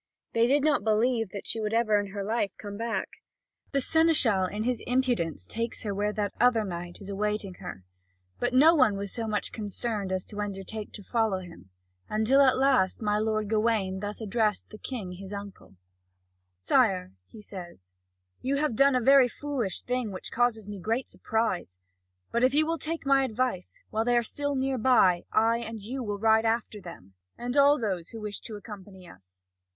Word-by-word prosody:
They 230 Hz, 0 st, +4 dB
do 280 Hz, +3 st, +4 dB
not 290 Hz, -7 st, +2 dB
believe 225 Hz, 0 st, +2 dB
that 200 Hz, -, -7 dB
she 225 Hz, -, 0 dB
will 215 Hz, +1 st, -1 dB
ever 215 Hz, -3 st, +3 dB
in 205 Hz, -, -3 dB
her 200 Hz, +1 st, -5 dB
life 215 Hz, 0 st, 0 dB
come 205 Hz, -1 st, -7 dB
back. 230 Hz, +2 st, -2 dB, 0.6 s
The 275 Hz, -, +1 dB
seneschal 270 Hz, -, +3 dB
in 210 Hz, +3 st, -3 dB
his 245 Hz, 0 st, -1 dB
impudence 245 Hz, -, 0 dB
takes 230 Hz, -, -3 dB
her 205 Hz, -2 st, -2 dB
where 205 Hz, +1 st, 0 dB
that 210 Hz, -1 st, -2 dB
other 240 Hz, -3 st, +4 dB
knight 175 Hz, -2 st, -6 dB
is 195 Hz, -, -9 dB
awaiting 210 Hz, -1 st, -2 dB
her. 180 Hz, -, -8 dB, 0.6 s
But -, -, 0 dB
no 290 Hz, +6 st, +7 dB
one 255 Hz, -10 st, +4 dB
was 200 Hz, -1 st, -4 dB
so 230 Hz, -2 st, -3 dB
much 210 Hz, -1 st, -1 dB
concerned 210 Hz, -1 st, -3 dB
as 185 Hz, -1 st, -2 dB
to 210 Hz, -1 st, -6 dB
undertake 205 Hz, +1 st, -5 dB
to 205 Hz, -, -9 dB
follow 220 Hz, -3 st, +1 dB
him; 170 Hz, -, -13 dB, 0.4 s
until 220 Hz, +6 st, +3 dB
at 260 Hz, -2 st, +5 dB
last 255 Hz, -7 st, +2 dB
my 210 Hz, 0 st, +1 dB
lord 215 Hz, -1 st, 0 dB
Gawain 215 Hz, -3 st, +1 dB
thus 205 Hz, +1 st, -5 dB
addressed 215 Hz, -1 st, 0 dB
the 215 Hz, -, -10 dB
King 220 Hz, -9 st, -5 dB
his 190 Hz, +2 st, -9 dB
uncle: 200 Hz, -, -9 dB, 0.8 s
"Sire," 90 Hz, 0 st, +2 dB, 0.2 s
he 220 Hz, -, -13 dB
says, 175 Hz, -, -10 dB, 0.5 s
"you 270 Hz, +2 st, 0 dB
have 290 Hz, -4 st, 0 dB
done 275 Hz, +2 st, +5 dB
a 250 Hz, -, +2 dB
very 270 Hz, +1 st, +6 dB
foolish 255 Hz, -6 st, -4 dB
thing, 250 Hz, -3 st, -2 dB
which 185 Hz, -, -6 dB
causes 230 Hz, -3 st, +1 dB
me 205 Hz, -1 st, -6 dB
great 230 Hz, +7 st, -2 dB
surprise; 220 Hz, -, -2 dB, 0.5 s
but 235 Hz, -, +1 dB
if 260 Hz, +2 st, +4 dB
you 310 Hz, +1 st, +4 dB
will 330 Hz, 0 st, -1 dB
take 320 Hz, +1 st, -4 dB
my 275 Hz, 0 st, +4 dB
advice, 245 Hz, -6 st, -2 dB
while 220 Hz, +1 st, +1 dB
they 240 Hz, +1 st, +2 dB
are 240 Hz, -, +3 dB
still 285 Hz, +4 st, -3 dB
near 265 Hz, -1 st, 0 dB
by, 190 Hz, -8 st, +4 dB
I 230 Hz, +1 st, +3 dB
and 225 Hz, -1 st, -6 dB
you 245 Hz, +6 st, -5 dB
will 205 Hz, -4 st, -3 dB
ride 220 Hz, +1 st, +3 dB
after 225 Hz, -2 st, -1 dB
them, 100 Hz, -, -11 dB, 0.2 s
and 245 Hz, +2 st, -4 dB
all 285 Hz, +1 st, +6 dB
those 190 Hz, -7 st, -2 dB
who 225 Hz, -, -8 dB
wish 210 Hz, -1 st, -4 dB
to 220 Hz, -, -8 dB
accompany 200 Hz, -3 st, -11 dB
us. 90 Hz, -, -18 dB
220 Hz, 190 wpm, -28 LUFS, 200-245 Hz, 0.8 s, no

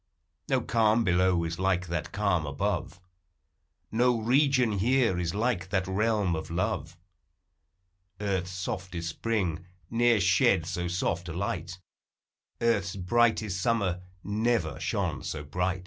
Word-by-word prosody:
No -, -, +2 dB
calm 115 Hz, 0 st, +3 dB
below 90 Hz, -2 st, +2 dB
is 85 Hz, +1 st, -4 dB
like 95 Hz, -1 st, +1 dB
that 85 Hz, -2 st, -3 dB
calm 100 Hz, -7 st, 0 dB
above, 70 Hz, +5 st, -2 dB, 0.9 s
No 120 Hz, +1 st, +3 dB
region 125 Hz, -2 st, +3 dB
here 115 Hz, -4 st, +2 dB
is 85 Hz, +1 st, -2 dB
like 105 Hz, -5 st, 0 dB
that 95 Hz, -1 st, 0 dB
realm 100 Hz, -2 st, +1 dB
of 80 Hz, 0 st, -5 dB
love; 85 Hz, 0 st, -2 dB, 1.2 s
Earth's 95 Hz, -3 st, -1 dB
softest 90 Hz, -2 st, -4 dB
spring 90 Hz, -3 st, -2 dB, 0.2 s
ne'er 120 Hz, -1 st, +4 dB
shed 100 Hz, -1 st, +3 dB
so 90 Hz, 0 st, -3 dB
soft 85 Hz, 0 st, -1 dB
a -, -, -4 dB
light, 90 Hz, -1 st, -3 dB, 0.8 s
Earth's 100 Hz, -5 st, +1 dB
brightest 105 Hz, 0 st, +1 dB
summer 100 Hz, -6 st, 0 dB, 0.2 s
never 105 Hz, -, 0 dB
shone -, -, -1 dB
so 75 Hz, -1 st, -5 dB
bright. 90 Hz, +5 st, -1 dB
95 Hz, 125 wpm, -28 LUFS, 90-110 Hz, 1.2 s, ne'er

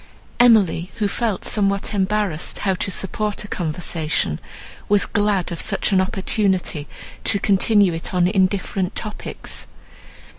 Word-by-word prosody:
Emily, 205 Hz, -7 st, +4 dB
who 210 Hz, -, 0 dB
felt 215 Hz, -1 st, -2 dB
somewhat 200 Hz, 0 st, +1 dB
embarrassed 195 Hz, -4 st, 0 dB
how 195 Hz, -, +3 dB
to 185 Hz, -, -2 dB
support 205 Hz, +2 st, -2 dB
a -, -, -8 dB
conversation, 160 Hz, -, -1 dB, 0.5 s
was 205 Hz, 0 st, +4 dB
glad 205 Hz, -4 st, 0 dB
of 170 Hz, -, -2 dB
such 205 Hz, 0 st, 0 dB
an 190 Hz, -1 st, +4 dB
opportunity 190 Hz, -5 st, -1 dB, 0.4 s
to 200 Hz, -, +2 dB
continue 200 Hz, -1 st, +3 dB
it 165 Hz, -, -4 dB
on 180 Hz, -2 st, +3 dB
indifferent 190 Hz, 0 st, 0 dB
topics. 215 Hz, -1 st, -5 dB
195 Hz, 125 wpm, -21 LUFS, 180-210 Hz, 0.5 s, Emily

